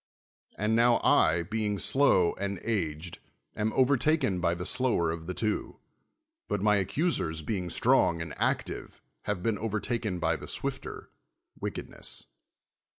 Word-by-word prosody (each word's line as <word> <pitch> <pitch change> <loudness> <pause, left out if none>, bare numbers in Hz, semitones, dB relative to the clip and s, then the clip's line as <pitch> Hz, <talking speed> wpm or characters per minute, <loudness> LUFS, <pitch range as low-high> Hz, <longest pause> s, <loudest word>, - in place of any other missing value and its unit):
And 105 +2 +1
now 120 0 +4
I, 85 +2 +4
being 105 +2 -1
slow 100 -9 +3
and 100 -1 -2
aged, 85 -6 -2 0.4
am 110 +1 0
overtaken 130 - +3
by 85 -1 +1
the 90 +1 -5
slower 100 -7 +1
of 80 0 -6
the 90 - -4
two; 110 -2 -2 0.7
but - - -1
my 105 -1 +4
accusers, 95 - 0
being 90 -1 -2
strong 85 0 +3
and 80 -2 -5
active, - - -2 0.3
have 105 -4 -2
been 110 -4 0
overtaken 110 -1 -2
by 85 -1 0
the - - -9
swifter, - - -4 0.5
wickedness. - - -5
100 Hz, 135 wpm, -29 LUFS, 85-115 Hz, 0.7 s, now